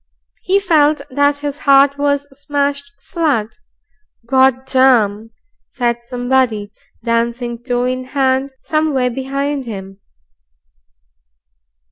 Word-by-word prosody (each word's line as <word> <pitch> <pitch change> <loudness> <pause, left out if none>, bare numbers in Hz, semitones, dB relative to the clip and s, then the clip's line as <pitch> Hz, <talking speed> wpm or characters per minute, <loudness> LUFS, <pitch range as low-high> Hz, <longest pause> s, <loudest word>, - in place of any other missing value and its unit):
He 385 +2 +2
felt 310 -6 +2
that 285 +2 +2
his 290 0 -3
heart 280 0 +4
was 285 0 0
smashed 280 0 -2
flat. 285 - -2 0.7
"Gord 260 +1 +3
darm!" 230 -5 +2 0.4
said 240 -2 -1
somebody, 245 -4 0 0.3
dancing 235 0 -1
toe 245 0 -1
in 255 0 -2
hand 265 0 0
somewhere 300 -5 0
behind 275 +2 -3
him. 195 -3 -8
265 Hz, 95 wpm, -17 LUFS, 240-285 Hz, 0.7 s, heart